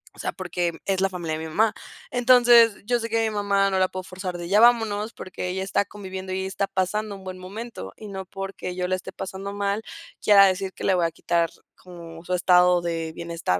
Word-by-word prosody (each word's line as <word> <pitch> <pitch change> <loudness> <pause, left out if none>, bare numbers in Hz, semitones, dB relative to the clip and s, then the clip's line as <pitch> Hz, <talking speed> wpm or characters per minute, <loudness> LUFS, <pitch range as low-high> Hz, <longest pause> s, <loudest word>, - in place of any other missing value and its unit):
o - - -17
sea, - - -2
porque 175 -2 -2
es 190 -1 0
la 195 - +2
familia 170 -4 -4
de 160 - -5
mi - - -6
mamá. 215 +6 +2 0.4
Entonces, 240 -3 +5
yo 240 +2 +1
sé 230 0 -4
que 225 0 +1
mi 215 - -6
mamá 200 -1 +2
no 190 - +1
la 185 - +4
puedo 185 0 -6
forzar 185 -1 -6
de 175 0 -6
ya 205 +2 +4
vámonos, 225 -2 +3
porque 185 -1 -6
ella 190 +1 -2
está 195 +1 0
conviviendo 190 -2 -7
y 190 - -1
ella 190 - -2
está 195 +1 -1
pasando 200 +2 -2
un 195 - -12
buen 185 0 -7
momento, 190 - -8
y 215 - -9
no 190 -1 -6
porque 195 -1 -6
yo 180 0 -2
la 185 - +1
esté 185 - -8
pasando 190 +1 -6
mal, 200 +1 -1 0.4
quiera 200 -2 +7
decir 190 0 -1
que - - -9
le 195 - +3
voy 175 -2 +2
a 165 - -1
quitar 170 +1 0 0.3
como 170 -2 -12
su 180 - -2
estado 180 0 +4
de 165 -1 -3
bienestar 170 - -2
190 Hz, 235 wpm, -24 LUFS, 180-205 Hz, 0.4 s, quiera